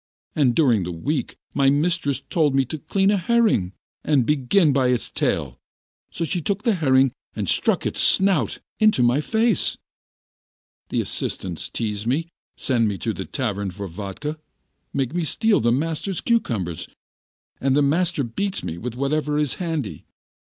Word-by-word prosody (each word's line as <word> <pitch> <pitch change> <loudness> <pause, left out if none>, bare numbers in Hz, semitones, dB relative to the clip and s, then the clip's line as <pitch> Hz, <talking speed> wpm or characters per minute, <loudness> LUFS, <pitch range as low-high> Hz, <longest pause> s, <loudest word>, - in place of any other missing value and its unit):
And 130 -6 +3
during 125 -10 +4
the 90 - -4
week, 130 - -3 0.2
my 135 -1 +4
mistress 145 -2 0
told 150 -5 +2
me 135 -1 +3
to 155 +5 -6
clean 195 +6 +1
a 205 - +3
herring, 200 - +2 0.3
and 145 -4 +3
I - - -7
began 150 - +3
by 130 -2 +3
its 125 -1 0
tail, - - -1 0.5
so 170 - -3
she 175 +2 -2
took 200 +5 -2
the 230 - +3
herring 135 -6 +3 0.2
and - - -3
stuck - - +1
its - - 0
snout 190 -4 +3 0.2
into 215 - +4
my 120 +5 +3
face. 220 +2 +1 1.1
The - - 0
assistants 90 -4 -3
tease 105 -1 -3
me, 160 +7 0 0.3
send 120 -4 +1
me 100 -2 -2
to 110 +6 -2
the 95 - -5
tavern 100 -7 -2
for 100 +2 -6
vodka, 105 - -6 0.5
make 135 0 -1
me 175 -1 0
steal 220 +7 +2
the 115 +1 +2
master's 165 +7 -1
cucumbers, 110 - -1 0.7
and 135 0 +2
the 145 - +4
master 165 +1 +1
beats 190 - -3
me 85 - -5
with 120 +2 -5
whatever 150 +3 0
is 150 -2 0
handy. 150 - -3
140 Hz, 165 wpm, -23 LUFS, 115-170 Hz, 1.1 s, during